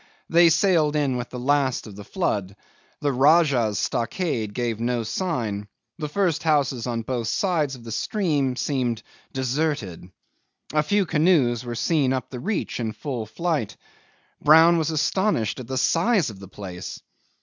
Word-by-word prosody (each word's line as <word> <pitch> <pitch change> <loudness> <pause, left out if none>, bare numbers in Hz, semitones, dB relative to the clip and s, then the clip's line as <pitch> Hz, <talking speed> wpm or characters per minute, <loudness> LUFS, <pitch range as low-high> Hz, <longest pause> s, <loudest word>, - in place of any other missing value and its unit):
They 170 0 +7
sailed 160 -3 +3
in 140 -4 +1
with 125 0 -4
the 125 - -7
last 135 0 +1
of 105 -3 -10
the 105 - -9
flood; 100 - -2 0.5
the 145 - +1
Rajah's 135 - +4
stockade 115 - -1
gave 120 -3 -2
no 120 0 0
sign; 110 - -2 0.3
the 150 -2 -3
first 175 -3 0
houses 140 -7 +1
on 115 -2 -2
both 120 -1 -3
sides 160 - 0
of 120 - -13
the 115 - -8
stream 145 - 0
seemed 125 -5 -1 0.3
deserted. 130 - -2 0.6
A 155 - +4
few 200 +6 +1
canoes 150 -8 +2
were 120 -1 -5
seen 140 0 +1
up 130 - -4
the 125 - -6
reach 200 - -2
in 110 -2 -2
full 125 -6 -5
flight. 155 - -2 0.6
Brown 165 +3 +6
was 160 -1 0
astonished 155 - 0
at 125 - -8
the 130 0 -3
size 170 - +2
of 100 - -13
the 100 - -10
place. 90 -2 -8
135 Hz, 160 wpm, -24 LUFS, 115-160 Hz, 0.6 s, They